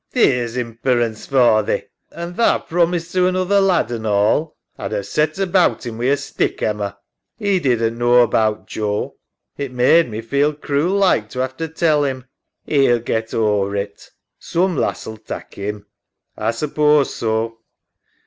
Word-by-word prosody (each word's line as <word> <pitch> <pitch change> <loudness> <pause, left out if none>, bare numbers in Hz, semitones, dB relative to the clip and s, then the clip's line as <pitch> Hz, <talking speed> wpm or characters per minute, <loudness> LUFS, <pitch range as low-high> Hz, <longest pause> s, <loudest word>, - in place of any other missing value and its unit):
'^ - - -49
Theer's 125 - +2
imperence 115 -1 -1
for 120 -5 +4
thee, 105 - -2 0.3
an' 170 +1 -6
tha 230 +6 +2
promised 170 0 0
to 180 -1 +3
another 185 +2 +2
lad, 180 -10 +2
an' 110 -2 -4
all. 105 +10 +1 0.2
A'd - - -4
'ave 100 -1 -2
set 150 - -1
about 190 -6 +2
'im 115 -1 -6
wi' 120 - -1
a 140 +2 +3
stick, 140 - -2
Emma. 100 -2 -2 0.4
EMMA. 205 -2 0
'E 190 - +3
didn't 115 -5 0
knaw 120 0 +5
about 110 -2 0
Joe. 105 -1 -3 0.4
It 140 -2 -3
made 130 +5 +4
me 110 0 -5
feel 140 +6 +1
cruel 150 +5 0
like 180 - +2
to 130 +2 -2
'ave 130 0 -4
to 165 - -3
tell 160 -2 +1
'im. 130 -2 -3 0.4
SARAH. 150 - 0
'E'U 120 -3 +4
get 110 0 -2
ower 105 -2 +1
it. 100 0 -5 0.3
Soom 180 +1 0
lass'U 110 -5 -3
tak' - - -8
'im. 105 +1 -3
EMMA. 105 -1 -16 0.6
A - - +3
suppose 150 +2 +2
so. 115 0 -2
125 Hz, 170 wpm, -19 LUFS, 110-160 Hz, 0.6 s, knaw